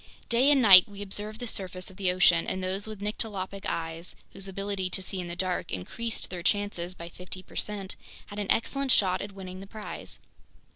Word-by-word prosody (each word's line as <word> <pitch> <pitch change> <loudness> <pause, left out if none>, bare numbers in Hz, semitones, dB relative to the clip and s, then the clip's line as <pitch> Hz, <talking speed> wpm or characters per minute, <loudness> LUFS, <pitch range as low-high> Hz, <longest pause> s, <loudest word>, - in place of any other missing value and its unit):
Day 245 +4 +5
and 280 -3 +5
night 190 -2 +10
we 200 0 -6
observed 210 +2 -1
the 245 - -4
surface 185 -4 -2
of 185 - -16
the 190 -3 +2
ocean, 180 -2 +5
and 185 - -1
those 190 +3 -2
with 215 -2 -7
nyctalopic 200 -2 -3
eyes, 165 +1 -3 0.2
whose 195 0 -3
ability 195 -1 -2
to 185 - -1
see 190 0 -4
in 180 - -4
the 170 - -5
dark 180 0 -1
increased 225 - -4
their 180 -2 -4
chances 185 -2 0
by 170 -1 -8
fifty 180 +2 -7
percent, 200 -2 -4 0.3
had 205 - -7
an 205 - -3
excellent 275 +4 +1
shot 185 -5 +4
at 200 0 -6
winning 185 -1 -8
the 195 - -9
prize. 215 +1 -7
195 Hz, 200 wpm, -29 LUFS, 185-205 Hz, 0.3 s, night